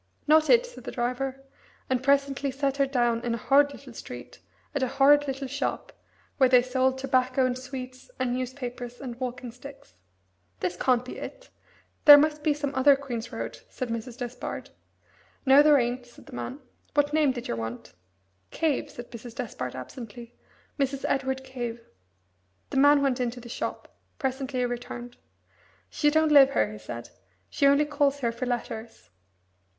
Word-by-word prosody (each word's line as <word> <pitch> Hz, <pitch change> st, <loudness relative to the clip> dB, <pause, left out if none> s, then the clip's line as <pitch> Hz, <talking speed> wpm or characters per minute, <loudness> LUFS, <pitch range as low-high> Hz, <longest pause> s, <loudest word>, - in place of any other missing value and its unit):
"Not 310 Hz, +1 st, +5 dB
it," -, -, +6 dB
said -, -, -12 dB
the -, -, -4 dB
driver, 260 Hz, +2 st, -2 dB, 0.4 s
and 255 Hz, -1 st, 0 dB
presently 280 Hz, 0 st, +2 dB
set 275 Hz, +1 st, -1 dB
her 275 Hz, -1 st, +3 dB
down 240 Hz, -3 st, +1 dB
in 235 Hz, -1 st, 0 dB
a -, -, -4 dB
horrid 285 Hz, +5 st, +4 dB
little -, -, -12 dB
street, -, -, -9 dB, 0.3 s
at 280 Hz, -, -1 dB
a 260 Hz, -, +2 dB
horrid 285 Hz, +3 st, +5 dB
little 270 Hz, 0 st, -3 dB
shop, 280 Hz, +2 st, -3 dB, 0.4 s
where 260 Hz, -2 st, +5 dB
they 250 Hz, -1 st, +6 dB
sold 260 Hz, +1 st, +1 dB
tobacco 260 Hz, 0 st, +2 dB
and 250 Hz, -1 st, 0 dB
sweets 255 Hz, -, -8 dB
and 250 Hz, -1 st, 0 dB
newspapers 245 Hz, -1 st, -5 dB
and 245 Hz, -3 st, -7 dB
walking 250 Hz, -1 st, -4 dB
sticks. 270 Hz, -, -13 dB, 0.7 s
"This 180 Hz, 0 st, -2 dB
can't 250 Hz, +5 st, +2 dB
be -, -, -7 dB
it! -, -, -9 dB, 0.5 s
There 290 Hz, -1 st, +12 dB
must 300 Hz, +1 st, +2 dB
be 300 Hz, -, +2 dB
some 285 Hz, -1 st, -2 dB
other 275 Hz, +1 st, +6 dB
Queen's 250 Hz, -4 st, -5 dB
Road?" -, -, -5 dB
said 255 Hz, -2 st, -5 dB
Mrs. 230 Hz, +1 st, -5 dB
Despard. 245 Hz, -1 st, -6 dB, 0.7 s
"No 270 Hz, +1 st, +8 dB
there 295 Hz, -1 st, +6 dB
ain't," 245 Hz, 0 st, -1 dB
said 240 Hz, -, -17 dB
the 280 Hz, -, -14 dB
man. 265 Hz, +4 st, -6 dB, 0.3 s
"What 290 Hz, 0 st, +2 dB
name 305 Hz, -3 st, +4 dB
did 245 Hz, -2 st, -6 dB
yer -, -, -2 dB
want?" 115 Hz, -1 st, -6 dB, 0.6 s
"Cave," 315 Hz, -4 st, 0 dB
said 240 Hz, 0 st, -10 dB
Mrs. 235 Hz, 0 st, -9 dB
Despard 130 Hz, -, -5 dB
absently; 230 Hz, -, -9 dB, 0.5 s
"Mrs. 275 Hz, 0 st, -1 dB
Edward 265 Hz, -1 st, -1 dB
Cave." 240 Hz, -3 st, -6 dB, 0.9 s
The -, -, -1 dB
man 285 Hz, +1 st, +6 dB
went 265 Hz, -2 st, +1 dB
into 245 Hz, 0 st, -2 dB
the 240 Hz, 0 st, -11 dB
shop. -, -, -5 dB, 0.2 s
Presently 265 Hz, -1 st, -2 dB
he -, -, +2 dB
returned. 245 Hz, 0 st, -6 dB, 0.7 s
"She 295 Hz, -, +2 dB
don't 315 Hz, 0 st, +3 dB
live 275 Hz, -2 st, +7 dB
here," 105 Hz, -1 st, +2 dB
he 105 Hz, -, -9 dB
said; 115 Hz, +2 st, -8 dB, 0.4 s
"she 280 Hz, -, +3 dB
only 280 Hz, +2 st, +5 dB
calls 285 Hz, -1 st, +1 dB
here 235 Hz, -2 st, +1 dB
for 235 Hz, +2 st, -4 dB
letters." 225 Hz, -, -5 dB
260 Hz, 170 wpm, -27 LUFS, 240-280 Hz, 0.9 s, There